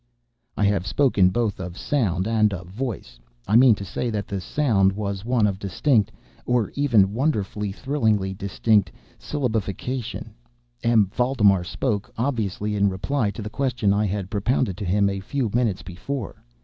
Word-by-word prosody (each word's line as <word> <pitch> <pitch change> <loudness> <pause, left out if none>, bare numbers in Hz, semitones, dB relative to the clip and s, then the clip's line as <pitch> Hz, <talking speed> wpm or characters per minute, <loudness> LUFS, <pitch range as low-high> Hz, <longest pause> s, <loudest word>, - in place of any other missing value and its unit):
I - - +1
have 100 -2 +1
spoken 100 -3 +3
both 110 0 -1
of 90 -1 -6
"sound" 100 -9 0
and 105 -3 +2
of 90 0 -8
"voice." 100 - -5 0.3
I 105 - +2
mean 120 -1 +7
to 100 - -7
say 120 - -3
that 105 -3 -3
the 100 -2 -4
sound 100 - +2
was 100 -1 -4
one 120 -2 +2
of 100 -2 -1
distinct—of 115 +1 0
even 115 -9 +3
wonderfully, 105 -6 -1
thrillingly 110 -6 0
distinct—syllabification. 110 - -2 0.5
M. 115 -3 +4
Valdemar 110 -8 +3
spoke—obviously 105 -1 -2
in 100 0 +3
reply 105 +5 -1
to 105 +2 -6
the 105 - -5
question 125 -7 0
I 105 +1 +1
had 95 -1 -4
propounded 105 -1 0
to 105 - -4
him 100 +3 +2
a 100 0 -2
few 120 +3 -2
minutes 115 -6 0
before. 100 +6 -6
105 Hz, 150 wpm, -23 LUFS, 95-120 Hz, 0.5 s, mean